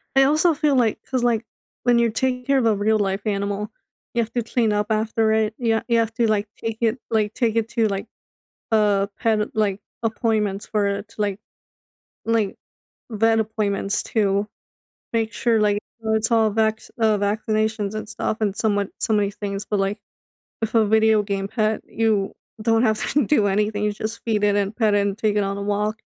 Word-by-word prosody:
I 270 - +7
also 310 +4 +4
feel 295 -1 +1
like 235 -4 +2
'cause, 255 -2 0
like, 235 -2 +1 0.4
when 240 -1 +4
you're 235 -1 +2
taking 250 +2 -1
care 275 -1 +3
of 250 - +2
a 220 -2 +3
real 215 +2 +2
life 195 0 0
animal, 205 0 -2 0.4
you 235 - +2
have 225 - -4
to 240 - 0
clean 230 -1 +1
up 210 0 0
after 220 0 +1
it. 220 0 +1
You 225 -2 +1
you 235 -1 +3
have 225 -1 0
to, 235 -2 +2
like, 210 -1 +1
take 225 -1 -4
it 230 +2 +1
like, 215 -1 +1
take 230 -3 0
it 225 -1 0
to, 230 -2 +1
like, 200 +1 -3 0.6
uh, 205 -2 +3
pet, 220 -1 0
like, 205 -2 0 0.2
appointments 215 -3 0
for 210 -2 +1
it 200 +1 -3
to, 215 - -7
like 200 -1 -1 0.9
like, 225 -3 +1 0.5
vet 225 +1 +2
appointments 210 -2 0
to 200 -1 0 0.6
make 225 -1 0
sure, 230 0 +1
like, 205 -1 +2 0.2
it's 220 0 0
all 225 -2 +4
vax 220 0 0
uh, 220 -2 +3
vaccinations 215 0 -1
and 215 -1 -5
stuff 215 0 -2
and 205 -3 0
somewhat 205 -2 0
so 225 - 0
many 205 -2 +2
things. 200 -1 -4
But, 205 -2 -1
like, 195 +1 -1 0.6
with 225 0 -3
a 225 -1 +5
video 220 0 +4
game 195 -1 -2
pet, 215 0 0
you 215 -3 0 0.3
don't 225 +1 +3
have 215 -3 +2
to 290 -2 +3
do 220 -7 +3
anything. 210 +1 0
You 210 - +1
just 215 +2 -5
feed 215 -3 0
it 205 0 +3
and 200 +1 0
pet 215 -3 +2
it 205 - +4
and 200 0 -2
take 215 -2 0
it 205 - +2
on 195 0 -2
a - - -4
walk. 210 +2 -1
215 Hz, 200 wpm, -22 LUFS, 205-225 Hz, 0.9 s, I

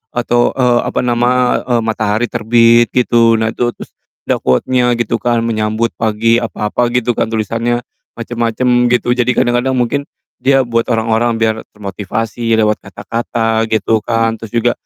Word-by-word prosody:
atau, 120 0 +1
eee, 125 -2 +2
apa - - -2
nama, 125 +1 +1 0.2
eee, 115 - +2
matahari 110 +1 -1
terbit 115 +1 +4
gitu, 115 -2 +3
nah, 110 0 0
itu, 120 0 -2
terus - - -11 0.3
ada - - -1
quote-nya 125 - +1
gitu 115 0 -1
kan, 120 -1 0
menyambut 110 0 -1
pagi 115 +1 +2
apa-apa 115 +2 -2
gitu 125 -1 +1
kan, - - +1
tulisannya 115 +2 -2 0.3
macem-macem, 120 +1 0
gitu, 120 0 +1
jadi 125 -1 +1
kadang-kadang 120 +2 +1
mungkin 135 +4 -1 0.3
dia 135 0 +3
buat 115 -1 -1
orang-orang 115 0 +1
biar 110 -1 +1 0.2
termotivasi 110 +3 -3
lewat 105 0 +2
kata-kata, 115 +2 -2
gitu 110 +1 +2
kan. 115 -1 0
Terus 115 -1 -11
juga 120 +1 +2
115 Hz, 150 wpm, -15 LUFS, 110-120 Hz, 0.3 s, terbit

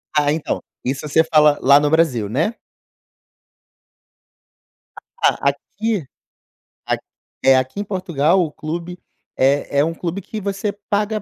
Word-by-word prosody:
Ah, 145 -1 +3
então, 155 0 -2 0.2
isso 135 +3 -2
você 160 +3 +4
fala 150 -2 +4
lá 140 +2 +6
no 145 - +1
Brasil, 140 -10 +2
né? 160 - 0 2.7
Ah, - - +3
aqui 215 -8 -4 0.8
a - - +1 0.5
é, 135 0 +7
aqui 130 +9 -2
em - - -2
Portugal 185 -3 +1
o 155 - -4
clube 170 +4 -6 0.4
é 140 +1 +2
é 145 - +4
um 165 - -2
clube 180 +3 -4
que 215 +3 -7
você 200 +1 -2 0.2
paga 210 +1 0
160 Hz, 135 wpm, -20 LUFS, 145-195 Hz, 2.7 s, é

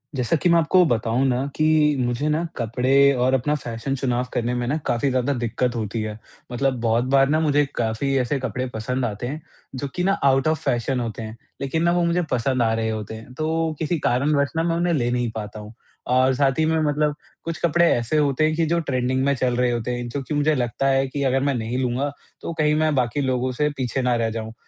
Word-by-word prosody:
जैसा 125 +4 +1
कि 175 - +3
मैं 170 - +5
आपको 175 +3 +4
बताऊँ 120 -1 +1
ना 130 +1 0
कि 155 -1 +3
मुझे 120 +4 -1
ना, 155 +3 0
कपड़े 130 +4 +3
और 125 +1 +1
अपना 135 +3 +1
फ़ैशन 120 0 -4
चुनाव 125 -2 -1
करने 120 +1 -1
में 120 0 -2
ना 145 +5 0
काफ़ी 120 +4 +1
ज़्यादा 130 +2 0
दिक्कत 120 0 -1
होती 110 0 -3
है। 110 -1 -4 0.3
मतलब 130 +1 0
बहुत 115 +1 +2
बार 135 0 +4
ना, 155 - +2
मुझे 145 -2 +2
काफ़ी 120 +4 -1
ऐसे 130 +3 0
कपड़े 130 0 -3
पसंद 125 +4 -2
आते 110 +1 -4
हैं, 150 +5 -5 0.3
जो 140 +2 -3
कि 180 - -1
ना 195 +2 +3
आउट 135 +1 +3
ऑफ़ 155 -1 +1
फ़ैशन 125 +2 0
होते 115 -2 -4
हैं, 110 0 -7 0.3
लेकिन 140 +4 -1
ना 170 - +3
वो 175 0 +2
मुझे 170 +1 +1
पसंद 125 +1 +1
आ 115 -1 +2
रहे 115 0 -1
होते 110 0 -4
हैं। 115 +3 -11
तो 160 +3 -1
किसी 165 +2 0
कारणवश 140 +2 +1
ना 165 - +2
मैं 165 0 0
उन्हें 170 0 +1
ले 120 -6 +1
नहीं 120 -1 0
पाता 105 0 -6
हूँ, 105 +1 -10 0.3
और 130 +1 +3
साथ 135 +1 +1
ही 160 - +3
में 160 0 +1
मतलब 150 0 +1 0.3
कुछ 165 -1 -4
कपड़े 170 +1 +3
ऐसे 120 +6 0
होते 145 -1 +2
हैं 155 - +1
कि 165 0 +1
जो 170 +2 +1
ट्रेंडिंग 130 -3 -1
में 140 - +3
चल 125 -1 0
रहे 125 0 +2
होते 120 0 -2
हैं, 120 0 -4
जो 140 +4 -3
कि 135 - -5
मुझे 150 +1 +2
लगता 125 +1 -1
है 135 0 +3
कि 140 +2 -3
अगर 135 0 +2
मैं 140 0 +1
नहीं 115 +1 -3
लूँगा, 130 +3 -1 0.3
तो 170 - -4
कहीं 150 -2 +2
मैं 155 0 +2
बाकी 130 +2 0
लोगों 130 -1 0
से 150 +4 0
पीछे 130 0 -1
ना 125 -1 +1
रह 115 -1 0
जाऊँ। 110 0 -5
130 Hz, 240 wpm, -23 LUFS, 120-150 Hz, 0.3 s, मैं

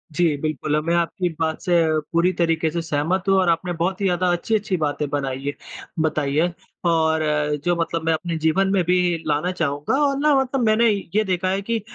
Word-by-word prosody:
जी, 165 -2 +2
बिल्कुल 150 0 -1
मैं 170 +1 +1
आपकी 170 +1 0
बात 160 -1 -1
से 180 - -1 0.4
पूरी 170 +2 +3
तरीके 165 -1 +1
से 170 - -2
सहमत 165 +4 -1
हूँ 195 - +5
और 185 -2 +2
आपने 175 +2 0
बहुत 185 +4 -2
ही - - +1
ज़्यादा 180 -1 +1
अच्छी-अच्छी 200 +2 0
बातें 150 -2 -1
बनाई 135 -2 -3
हैं 145 - -1 0.5
बताई 145 -3 -1
हैं, 170 +3 +2 0.3
और 160 -1 +2 0.4
जो 175 0 +2
मतलब 165 0 -2
मैं 165 - +3
अपने 165 +1 -3
जीवन 160 +5 +2
में 185 -3 +2
भी 180 +2 +2 0.3
लाना 150 +4 0
चाहूँगा 155 - -1
और 275 -1 0
ना 300 0 +3
मतलब 265 0 -1
मैंने 220 +2 +4 0.3
ये 215 - +4
देखा 185 -1 -1
है 195 +1 0
कि 230 +2 -2
170 Hz, 200 wpm, -22 LUFS, 160-190 Hz, 0.5 s, हूँ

